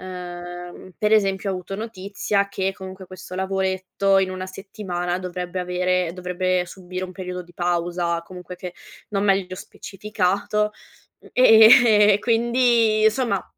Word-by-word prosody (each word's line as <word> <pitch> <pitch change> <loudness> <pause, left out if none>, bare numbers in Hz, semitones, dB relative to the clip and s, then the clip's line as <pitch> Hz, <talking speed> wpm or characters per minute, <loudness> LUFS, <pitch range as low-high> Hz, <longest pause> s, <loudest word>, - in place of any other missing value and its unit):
Ehm, 175 0 -8
per 210 0 +1
esempio, 195 -2 +2
ho - - -1
avuto 185 +1 -6
notizia 200 -1 -2
che 195 -1 -2
comunque 190 -1 -9
questo 185 0 -10
lavoretto 190 +1 0
in 190 -1 +1
una 185 0 -5
settimana 185 -2 -4
dovrebbe 180 0 -5
avere 180 -1 0
dovrebbe 180 0 -1
subire 185 0 -7
un 185 - -8
periodo 180 0 -6
di 175 0 -19
pausa 175 -1 -1
comunque 180 +1 -10
che 180 0 -8 0.3
non 200 -1 -1
meglio 190 -2 +1
specificato, 205 +2 -2 0.6
ehm, 220 -3 +7
quindi, 235 -1 +2
insomma, 220 -2 +1
190 Hz, 130 wpm, -22 LUFS, 180-205 Hz, 0.6 s, ehm